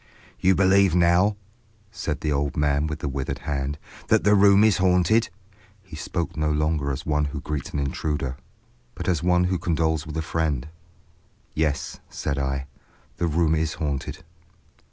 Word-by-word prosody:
"You 95 +1 +4
believe 95 -1 +4
now," 90 +4 +3 0.5
said 80 -8 -4
the 75 - -1
old 70 0 -1
man 75 +1 +1
with 80 0 -5
the - - -2
withered 70 0 -3
hand, 70 0 -2 0.3
"that - - +3
the 105 - +4
room 100 0 +6
is 110 -5 +4
haunted?" 95 +5 +3 0.5
He 90 -5 -11
spoke 85 +2 -3
no 75 -1 0
longer 75 -1 0
as 65 - -5
one 75 -1 +1
who 70 +1 -4
greets 75 0 -4
an - - -5
intruder, 70 -1 -2 0.6
but - - -6
as 85 -4 +1
one 90 0 +3
who 90 0 0
condoles 80 -3 0
with 75 +1 -5
a 80 - -1
friend. 80 -4 -1 0.8
"Yes," 75 -3 -1
said 70 -1 -3
I, 65 0 -2 0.5
"the 85 - 0
room 80 0 +2
is 80 0 0
haunted." 70 -4 -4
80 Hz, 165 wpm, -24 LUFS, 70-90 Hz, 0.8 s, room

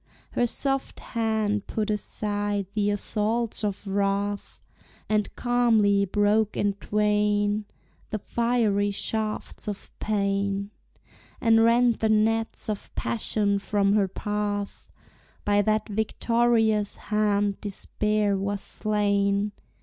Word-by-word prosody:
Her 240 - +1
soft 270 +2 0
hand 220 -3 -1
put 215 -1 -1
aside 205 -1 -1
the 205 -1 +1
assaults 215 +3 0
of 205 0 -2
wrath, 200 +1 -2 0.4
And 210 -1 +1
calmly 225 -5 +3
broke 205 +2 +1
in 205 -1 +1
twain 210 0 +1 0.4
The 215 - -2
fiery 220 -2 +1
shafts 215 +2 -3
of 205 -1 -6
pain, 200 -1 -1 0.7
And 225 -2 +4
rent 235 0 +4
the 220 - +1
nets 225 +1 +1
of 210 -2 -4
passion 200 - 0
from 200 0 +1
her 205 -2 +3
path. 205 +1 -3 0.6
By 205 0 +3
that 215 +1 +1
victorious 220 0 +1
hand 205 -1 0
despair 210 0 -1
was 200 +1 -2
slain. 200 -1 0
210 Hz, 105 wpm, -26 LUFS, 200-220 Hz, 0.7 s, And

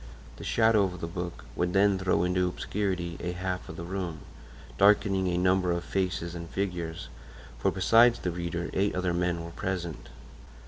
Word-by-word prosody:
The - - -9
shadow 110 -2 +4
of 90 -2 -5
the 85 - -3
book 85 0 -6
would 90 0 0
then 100 0 +4
throw 95 -2 +2
into 90 0 +1
obscurity 90 -2 -2
a 90 0 -3
half 90 0 -4
of - - -7
the - - -6
room, 90 -3 -4 0.6
darkening 100 -2 +4
a 90 -1 0
number 90 0 +2
of 85 0 -1
faces 90 -2 -2
and 85 -1 -7
figures; 90 -4 -3 0.5
for - - +2
besides 115 +6 +5
the 90 - -2
reader, 85 0 -3
eight 100 +2 +1
other 90 -1 0
men 85 -1 0
were 85 - -8
present. 90 -4 -4
90 Hz, 175 wpm, -28 LUFS, 85-95 Hz, 0.6 s, besides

